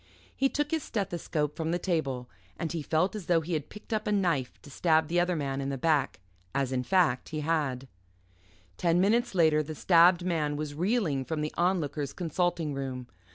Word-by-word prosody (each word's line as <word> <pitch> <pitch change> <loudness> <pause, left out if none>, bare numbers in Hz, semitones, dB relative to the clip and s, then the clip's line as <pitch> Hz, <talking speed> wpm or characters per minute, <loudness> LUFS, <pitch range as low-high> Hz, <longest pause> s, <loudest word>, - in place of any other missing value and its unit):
He 270 - +2
took 295 +1 -1
his 320 -1 +1
stethoscope 170 - -2
from 160 -1 -2
the 175 - +1
table, 140 -9 -2 0.3
and 165 - -3
he 165 -2 -3
felt 165 +7 +1
as 205 -6 -6
though 170 -2 +3
he 170 +2 -4
had 150 -3 -2
picked 210 +2 -8
up 215 0 -1
a - - +1
knife 170 -11 0
to 145 - -12
stab 160 +1 +2
the 175 +1 +2
other 175 0 +1
man 140 -3 -2
in 135 - -2
the 135 - -2
back. 145 - +1 0.4
As, 135 -2 0
in 130 -1 0
fact, 145 -3 +2
he 155 -1 -3
had. 145 -5 -1 0.9
Ten 170 0 +2
minutes 215 +3 +2
later, 160 -3 +4
the 155 +1 -6
stabbed 175 +2 +5
man 155 -5 0
was 150 0 -4
reeling 170 - 0
from 155 +3 -3
the 150 - -3
Onlooker's 160 -6 0
consulting 175 -2 -1
room. 130 -3 -5
160 Hz, 200 wpm, -29 LUFS, 145-180 Hz, 0.9 s, stabbed